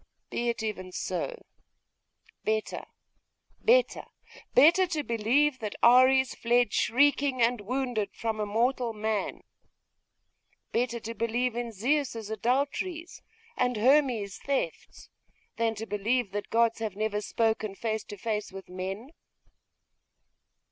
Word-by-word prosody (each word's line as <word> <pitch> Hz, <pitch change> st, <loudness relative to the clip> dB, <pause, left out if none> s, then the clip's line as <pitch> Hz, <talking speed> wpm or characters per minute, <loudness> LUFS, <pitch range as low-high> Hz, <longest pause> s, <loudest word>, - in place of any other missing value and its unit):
Be 240 Hz, 0 st, -1 dB
it 230 Hz, -1 st, -2 dB
even 185 Hz, -4 st, -4 dB
so. 485 Hz, -, -4 dB, 1.0 s
Better, 215 Hz, 0 st, -2 dB, 0.7 s
better, -, -, +3 dB, 0.5 s
better, 340 Hz, +8 st, +6 dB
to 315 Hz, -4 st, -2 dB
believe 255 Hz, +5 st, +1 dB
that 210 Hz, -2 st, -5 dB
Ares 255 Hz, +2 st, +6 dB
fled 240 Hz, -2 st, +2 dB
shrieking 280 Hz, +1 st, +2 dB
and 235 Hz, -1 st, +2 dB
wounded 240 Hz, -2 st, -2 dB
from 225 Hz, -1 st, -3 dB
a 210 Hz, -, -1 dB
mortal 235 Hz, +2 st, 0 dB
man 215 Hz, -1 st, -2 dB, 1.3 s
better 235 Hz, 0 st, 0 dB
to 230 Hz, +1 st, -6 dB
believe 230 Hz, +1 st, -1 dB
in 240 Hz, -1 st, -3 dB
Zeus's 230 Hz, -1 st, -1 dB
adulteries 285 Hz, -, -2 dB, 0.3 s
and 250 Hz, -2 st, 0 dB
Hermes's 245 Hz, -5 st, +2 dB
thefts 280 Hz, -, -4 dB, 0.5 s
than 230 Hz, -1 st, 0 dB
to 220 Hz, +1 st, -5 dB
believe 210 Hz, +2 st, -1 dB
that 205 Hz, 0 st, -4 dB
gods 230 Hz, 0 st, +2 dB
have 220 Hz, -4 st, -3 dB
never 210 Hz, 0 st, -1 dB
spoken 220 Hz, -1 st, -1 dB
face 220 Hz, +1 st, -2 dB
to 205 Hz, -, -9 dB
face 210 Hz, 0 st, -3 dB
with 190 Hz, -1 st, -10 dB
men! 190 Hz, +8 st, -6 dB
230 Hz, 120 wpm, -28 LUFS, 215-260 Hz, 1.3 s, better